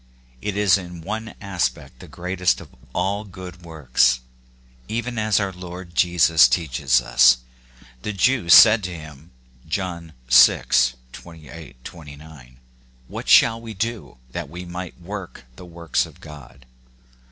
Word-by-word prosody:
It 105 -1 -4
is 100 -2 +3
in 90 -2 -10
one 110 +5 -6
aspect 90 -9 -4
the - - -12
greatest 90 0 -1
of - - -13 0.2
all 95 +7 -2
good 90 -3 -11
works, 65 -6 +1 0.7
even 120 +1 -4
as 110 -1 +1
our 100 -1 -2
Lord 90 -1 -10
Jesus 85 -5 +4
teaches 65 -2 0
us. 60 +1 +5 0.6
The 105 - -4
Jews 105 -2 +3
said 110 -1 +7
to 90 - -5
him 75 0 -12 0.4
(John 85 -2 -5
vi. 65 0 +6 0.5
28, 80 -6 -13
29), 75 -5 -13 0.2
" 60 0 -32
What - - -7
shall 115 0 +5
we 115 -2 -9
do, 115 - -5
that - - -6
we 90 +1 -9
might 90 +1 -8
work 90 -7 -9
the 90 - -12
works 85 -2 -2
of - - -18
God 70 -4 -14
85 Hz, 140 wpm, -21 LUFS, 75-95 Hz, 0.7 s, said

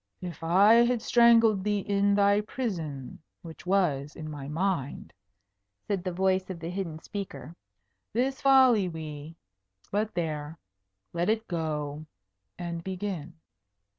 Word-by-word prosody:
"If 175 -2 -7
I 200 +8 +6
had 245 -1 +1
strangled 230 -4 +5
thee 210 0 +1
in 200 0 +2
thy 200 0 +4
prison, 165 - -5 0.2
which 165 +1 -11
was 150 -7 +1
in 155 -1 -7
my 140 -2 -7
mind," 155 - -2 0.7
said 195 -4 -1
the 185 - -2
voice 185 +1 +1
of 185 -3 -5
the 165 +1 -5
hidden 180 -4 -4
speaker, 165 -4 -7 0.6
"this 265 +4 -1
folly 260 -8 +5
we 155 -1 -7 0.6
but 210 0 -1
there. 155 -2 -3 0.6
Let 175 +3 0
it 220 +1 0
go, 155 -3 -3 0.5
and 170 -1 -5
begin." 185 -4 -5
180 Hz, 130 wpm, -28 LUFS, 160-205 Hz, 0.7 s, I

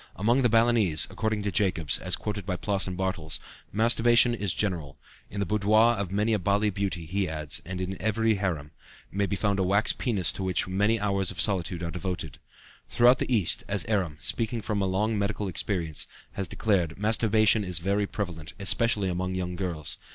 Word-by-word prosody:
Among 120 +6 +2
the 120 - +3
Balinese, 115 -7 +3
according 110 -2 -2
to 100 - -1
Jacobs 90 -8 +1
(as - - +1
quoted 105 -1 -4
by 90 0 -2
Ploss 100 +1 +1
and 90 -1 -4
Bartels), 90 -5 -2 0.3
masturbation 120 +2 +4
is 100 -5 -2
general; 85 -10 -3 0.3
in 100 - -6
the 100 - 0
boudoir 110 +3 +3
of 100 -4 -4
many 105 +3 +1
a 105 - +1
Bali 100 +3 +1
beauty, 95 -3 -3
he 95 +3 -1
adds, 75 -2 -1
and 90 +2 -5
certainly 95 +1 -4
in - - -9
every 110 +1 +1
harem, 85 -8 -3 0.4
may 100 +1 0
be 100 - -2
found 100 0 0
a - - +2
wax 100 +4 +3
penis 100 - 0
to - - -7
which 95 -1 0
many 105 +4 +1
hours 100 -2 0
of - - -7
solitude 90 -4 +1
are 85 - -3
devoted. 90 -5 -5 0.5
Throughout 125 +2 +5
the - - -2
East, 105 -8 +2
as 100 0 +1
Eram, 95 -8 -1
speaking 115 -1 0
from 105 -2 -1
a 95 - +1
long 105 +3 0
medical 100 0 -2
experience, 85 -4 -2 0.2
has 100 -2 -4
declared, 90 -7 0
masturbation 110 0 +3
is 90 -3 0
very 100 +4 0
prevalent, 85 -7 -5
especially 100 +1 +1
among 90 +1 -2
young 90 -1 -3
girls. 85 -6 -4
100 Hz, 195 wpm, -27 LUFS, 90-110 Hz, 0.5 s, Throughout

